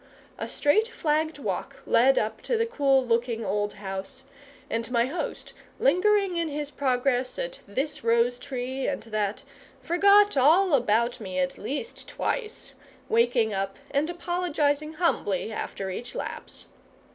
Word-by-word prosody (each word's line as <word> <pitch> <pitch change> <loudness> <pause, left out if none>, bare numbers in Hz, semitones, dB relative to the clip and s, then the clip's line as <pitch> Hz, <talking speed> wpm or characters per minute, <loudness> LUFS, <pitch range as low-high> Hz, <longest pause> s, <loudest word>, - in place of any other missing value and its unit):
A - - -4
straight 420 +10 +2
flagged 315 -6 -1
walk 285 - -4
led 260 +3 +4
up 215 0 -1
to 475 - 0
the 455 - +2
cool 275 - +2
looking 230 -1 0
old 205 +1 -1
house, 195 +5 -6 0.4
and 230 +1 -3
my 235 -1 +2
host, 295 +7 -5 0.3
lingering 410 -4 +3
in 335 -1 0
his 295 0 -4
progress 255 -2 0
at - - -4
this 270 +9 -3
rose 235 +1 +2
tree 260 0 -4
and 275 - -2
that, 215 -2 -2 0.4
forgot 400 +4 +5
all 320 +7 +5
about 235 -1 +2
me 190 -4 -5
at 180 -1 -1
least 290 - -5
twice, 435 - -3 0.4
waking 230 -1 +3
up 195 0 -2
and 290 +3 +1
apologising 315 -4 -1
humbly 225 - 0
after 195 -2 -4
each 240 +6 -6
lapse. - - -6
270 Hz, 140 wpm, -26 LUFS, 230-335 Hz, 0.4 s, forgot